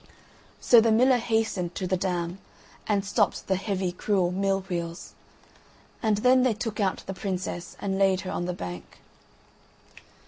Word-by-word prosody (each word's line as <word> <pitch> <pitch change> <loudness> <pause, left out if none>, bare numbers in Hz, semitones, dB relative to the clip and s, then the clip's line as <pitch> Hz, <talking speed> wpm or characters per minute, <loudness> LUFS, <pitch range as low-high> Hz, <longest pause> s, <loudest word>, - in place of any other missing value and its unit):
So 235 -2 +6
the 225 0 +3
miller 250 +3 +4
hastened 220 -7 -1
to 190 - -3
the 185 +1 +1
dam 180 -1 -2 0.5
and 205 -2 +1
stopped 195 - 0
the 190 - +1
heavy 190 -1 -2
cruel 180 -1 0
mill 195 +1 0
wheels. 170 -2 -5 0.9
And 215 -3 +2
then 255 +1 +6
they 250 -4 +2
took 220 0 -4
out 195 -2 0
the 195 - -4
princess 185 -2 -4
and 195 -1 -2
laid 190 -1 +3
her 185 - -5
on 175 - -2
the 180 - -2
bank. 90 - -8
195 Hz, 160 wpm, -26 LUFS, 180-215 Hz, 0.9 s, So